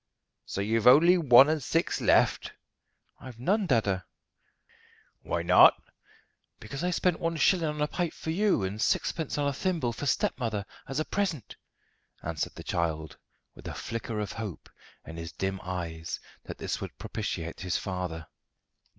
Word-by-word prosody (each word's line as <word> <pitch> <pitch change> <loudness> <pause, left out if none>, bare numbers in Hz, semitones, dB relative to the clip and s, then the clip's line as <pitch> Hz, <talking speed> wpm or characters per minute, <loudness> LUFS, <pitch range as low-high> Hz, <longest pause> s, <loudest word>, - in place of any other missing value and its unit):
"So 100 - -4
you've 110 +3 +1
only 160 +8 +8
one 130 -3 +8
and 155 0 0
six 165 +6 0
left?" - - +3 0.7
"I've 130 -3 -10
none, 195 - +1
dada." 105 - +2 1.2
"Why 85 - -2
not?" 90 +1 +7 0.8
"Because 135 +8 -6
I 180 - +1
spent 180 -1 +1
one 165 0 -1
shilling 165 +2 +3
on 150 0 -4
a - - +1
pipe 175 0 -2
for 160 - -5
you, 195 - +2
and 100 +3 -3
sixpence 160 -4 0
on 145 -1 +1
a 140 - 0
thimble 155 -6 -1
for 145 - -4
stepmother 115 -5 -1 0.2
as 135 +2 -3
a 155 - 0
present," 180 - -2 0.7
answered 80 -1 -3
the - - -9
child, 80 -2 -2 0.3
with - - -11
a - - -5
flicker 115 -1 -4
of 105 -3 -3
hope 110 -7 -7 0.3
in 80 - -9
his 85 0 -6
dim 95 0 -3
eyes 85 -3 -5 0.3
that - - -7
this - - -3
would - - -7
propitiate 85 0 -4
his 90 -2 -1
father. 90 -4 -4
115 Hz, 160 wpm, -28 LUFS, -, 1.2 s, only